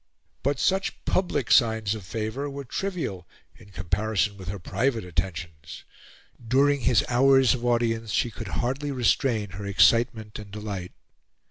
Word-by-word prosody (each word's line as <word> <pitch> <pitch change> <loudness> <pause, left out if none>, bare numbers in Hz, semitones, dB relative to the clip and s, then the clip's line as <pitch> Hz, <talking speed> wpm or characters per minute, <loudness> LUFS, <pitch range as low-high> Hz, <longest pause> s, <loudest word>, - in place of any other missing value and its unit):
But 140 0 0
such 190 +9 0
public 185 -1 0
signs 110 -4 +4
of 110 -3 -7
favour 110 +9 -4
were 140 0 -6
trivial 125 - -4 0.3
in 100 - -17
comparison 100 +2 -1
with 95 -3 -11
her 100 +2 -3
private 115 +4 -1
attentions. 80 -2 -5 0.6
During 140 +4 +3
his 125 -2 +3
flours 135 +1 +4
of 125 -2 -5
audience, 115 -2 0
she 120 - +1
could 110 -1 -8 0.2
hardly 135 +4 -2
restrain 120 -4 +1
her 100 +3 -7
excitement 110 +1 +2
and 105 -1 -10
delight. 100 -3 -6
110 Hz, 140 wpm, -26 LUFS, 100-130 Hz, 0.6 s, signs